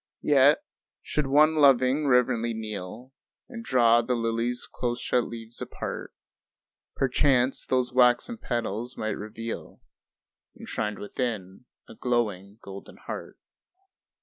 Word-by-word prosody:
Yet 145 - +5 0.4
should 150 -2 -1
one 150 +3 +5
loving 140 -1 +4
reverently 120 -2 +2
kneel 110 +3 -7 0.3
And 235 -2 -8
draw 120 - +4
the 125 +1 -1
lily's 115 +1 -1
close 120 0 -3
shut 125 - +1
leaves 115 0 -6
apart, - - -6 0.8
Perchance 130 -1 +2
those 125 -1 0
waxen 125 - +3
petals 120 - -3
might 110 - -2
reveal 110 +2 -6 0.8
Enshrined 105 -2 -3
within, 105 -2 -4 0.2
a - - -11
glowing 105 -5 -2
golden 100 0 -10
heart. - - -8
120 Hz, 110 wpm, -26 LUFS, 110-130 Hz, 0.8 s, Yet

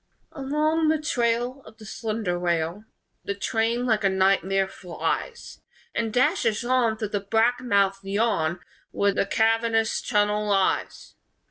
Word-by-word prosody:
Along 305 +3 0
the 315 0 +3
trail 245 -2 -1
Of 220 - -15
the 220 - -13
slender 215 -4 -3
rail 175 +3 -1 0.4
The 200 - -3
train, 225 +5 0
like 220 -3 +1
a 195 - +4
nightmare, 190 0 +2
flies 190 - -5 0.3
And 225 -1 -1
dashes 250 - +1
on 240 -3 +2
Through 215 -2 -3
the 205 - -1
black 225 +5 +1
mouthed 200 -5 +1
yawn 195 -5 0 0.3
Where 200 0 +1
the 195 - 0
cavernous 225 +1 +1
tunnel 210 -1 +1
lies. 195 -2 0
220 Hz, 135 wpm, -25 LUFS, 195-240 Hz, 0.4 s, a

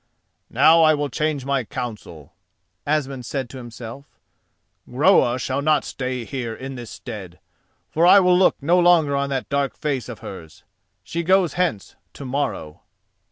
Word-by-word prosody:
"Now 155 +7 +5
I 155 -1 +5
will 145 -1 -2
change 150 -3 -2
my 135 -2 0
counsel," 105 - -8 0.5
Asmund 140 -4 -1
said 130 -2 -4
to 130 - -8
himself: 120 +2 -9 0.8
"Groa 130 -2 +3
shall 130 +2 -2
not 155 +1 +2
stay 125 -2 -4
here 120 -4 -5
in 135 +3 -7
this 120 -3 -8
stead, 95 -7 -9 0.5
for 165 +3 +3
I 200 - +8
will 180 -1 +4
look 185 +1 +4
no 175 +5 +3
longer 170 -5 +4
on 140 0 -1
that 135 -2 -3
dark 140 -1 -1
face 135 -5 -3
of 120 - -7
hers. 80 -5 -10 0.4
She 170 +11 -4
goes 185 -2 +2
hence 175 - -2 0.2
to 140 - -9
morrow." 125 - -3
135 Hz, 160 wpm, -22 LUFS, 120-155 Hz, 0.8 s, I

